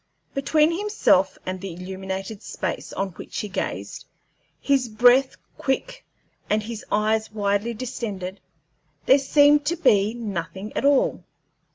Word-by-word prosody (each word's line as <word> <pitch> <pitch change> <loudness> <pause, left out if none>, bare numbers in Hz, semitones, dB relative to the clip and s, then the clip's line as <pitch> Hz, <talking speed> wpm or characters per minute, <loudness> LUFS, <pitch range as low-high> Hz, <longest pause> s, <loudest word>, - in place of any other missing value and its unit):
Between 305 +4 +2
himself 405 - +2
and 185 0 -4
the 190 -3 -6
illuminated 190 +3 -6
space - - -4
on 195 0 -2
which 175 - -9
he 210 - -2
gazed 190 - -4 0.5
his 270 -4 +1
breath 245 +4 +4 0.2
quick 265 -1 -2 0.5
and 215 0 +1
his 225 -1 -6
eyes 215 +1 +1
widely 205 +2 -1
distended 205 -6 -5 0.7
there 270 - +6
seemed 290 +1 +5
to 340 - +1
be 215 - +3
nothing 200 -2 -5
at - - -1
all. 280 -1 +3
215 Hz, 130 wpm, -24 LUFS, 195-270 Hz, 0.7 s, there